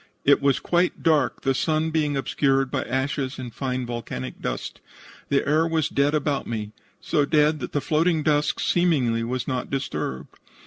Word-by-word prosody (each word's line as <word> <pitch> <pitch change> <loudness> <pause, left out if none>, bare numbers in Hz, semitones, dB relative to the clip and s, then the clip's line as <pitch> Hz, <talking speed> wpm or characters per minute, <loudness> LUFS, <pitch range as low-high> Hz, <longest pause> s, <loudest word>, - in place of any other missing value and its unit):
It 140 0 +5
was 140 -1 +2
quite 175 +1 0
dark, 155 -3 +2
the 135 - +2
sun 155 +3 0
being 150 -3 0
obscured 135 -1 +1
by - - 0
ashes 130 0 -2
and 125 -3 -7
fine 130 -2 -2
volcanic 115 - -6
dust. - - -4 0.5
The 140 - +1
air 155 +3 +3
was 160 -2 0
dead 140 +2 +2
about 145 -2 -1
me, 105 -2 -4 0.3
so 150 -4 +1
dead 150 +1 +3
that - - -5
the 145 - -1
floating 155 +3 +1
dust 150 -1 +1
seemingly 135 -10 +2
was 125 +2 -3
not 130 -2 -2
disturbed. 135 - -4
140 Hz, 170 wpm, -24 LUFS, 130-155 Hz, 0.5 s, It